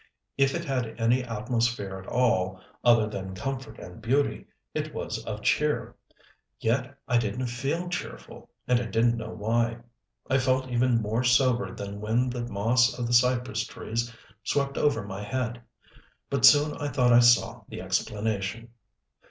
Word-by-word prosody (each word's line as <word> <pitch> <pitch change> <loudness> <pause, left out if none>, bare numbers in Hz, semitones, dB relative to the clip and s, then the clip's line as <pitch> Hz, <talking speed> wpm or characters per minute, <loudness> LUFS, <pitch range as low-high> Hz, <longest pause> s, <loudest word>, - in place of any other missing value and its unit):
If 135 -1 +2
it 170 0 -3
had 125 -6 -3
any 120 +3 +2
atmosphere 115 -3 -2
at 95 - -12
all, 95 -7 +1 0.2
other 115 -3 +5
than 95 -3 -6
comfort 135 +6 -5
and 90 +6 -11
beauty, 135 +5 0 0.3
it - - -4
was - - -4
of - - -5
cheer. - - +1 0.6
Yet 125 +4 -1
I 120 - +3
didn't 115 +3 -2
feel 135 +9 -2
cheerful, 175 0 -7 0.2
and 125 -1 +3
I 120 - -3
didn't 115 +1 +2
know 110 -1 -5
why. 115 +2 0 0.5
I 135 0 +2
felt 130 0 +1
even 120 -1 +2
more 110 +4 0
sobered 125 0 +2
than 100 0 -6
when 120 +4 +1
the 120 0 -4
moss 120 +4 +2
of 120 - -2
the 120 - -2
cypress 120 -2 +2
trees 120 +2 -4 0.3
swept 140 +2 0
over 125 -8 +1
my 95 0 -6
head. 120 +2 -3 0.7
But 140 -2 +4
soon 150 0 +6
I 145 - -3
thought 125 -3 +3
I 120 - +8
saw 120 0 +4
the - - -7
explanation. 105 +2 -2
120 Hz, 160 wpm, -27 LUFS, 110-130 Hz, 0.7 s, I